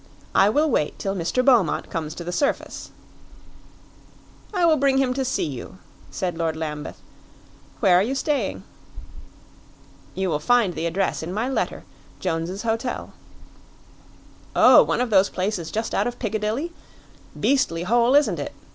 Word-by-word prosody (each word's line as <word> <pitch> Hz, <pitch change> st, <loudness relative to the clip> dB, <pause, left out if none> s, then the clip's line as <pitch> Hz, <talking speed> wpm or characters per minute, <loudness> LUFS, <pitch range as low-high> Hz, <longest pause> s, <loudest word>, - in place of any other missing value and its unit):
"I 195 Hz, -, +5 dB
will 295 Hz, +8 st, +2 dB
wait 150 Hz, -, 0 dB
till 195 Hz, -, -2 dB
Mr. 190 Hz, +8 st, -1 dB
Beaumont 240 Hz, -10 st, +3 dB
comes 155 Hz, -1 st, -4 dB
to 175 Hz, -, -6 dB
the 175 Hz, -, -4 dB
surface." 280 Hz, +10 st, -2 dB, 1.6 s
"I 365 Hz, -5 st, +1 dB
will 320 Hz, -2 st, +4 dB
bring 275 Hz, -1 st, +2 dB
him 265 Hz, -2 st, +2 dB
to 265 Hz, +1 st, -1 dB
see 255 Hz, -7 st, -1 dB
you," 140 Hz, +4 st, -7 dB, 0.3 s
said 180 Hz, -2 st, -3 dB
Lord 165 Hz, -1 st, 0 dB
Lambeth; 150 Hz, -2 st, -5 dB, 0.8 s
"where 185 Hz, -5 st, +5 dB
are -, -, +4 dB
you 245 Hz, +7 st, -1 dB
staying?" 285 Hz, +1 st, -1 dB, 1.5 s
"You 190 Hz, -1 st, -1 dB
will 150 Hz, -, 0 dB
find 225 Hz, +2 st, +2 dB
the 170 Hz, -, -2 dB
address 190 Hz, +3 st, -1 dB
in 160 Hz, +2 st, -5 dB
my 215 Hz, +6 st, -1 dB
letter 265 Hz, -, -2 dB, 0.4 s
Jones's 170 Hz, +5 st, -3 dB
Hotel." 230 Hz, +2 st, -3 dB, 1.4 s
"Oh, -, -, +8 dB
one -, -, 0 dB
of 250 Hz, -2 st, -1 dB
those 195 Hz, -1 st, +5 dB
places 185 Hz, -3 st, -3 dB
just 220 Hz, +4 st, -3 dB
out -, -, +1 dB
of 245 Hz, 0 st, -5 dB
Piccadilly? 220 Hz, -, -2 dB, 0.7 s
Beastly 260 Hz, -12 st, +1 dB
hole, 240 Hz, +6 st, +3 dB
isn't 290 Hz, 0 st, +3 dB
it?" -, -, -5 dB
210 Hz, 150 wpm, -23 LUFS, 175-255 Hz, 1.6 s, Oh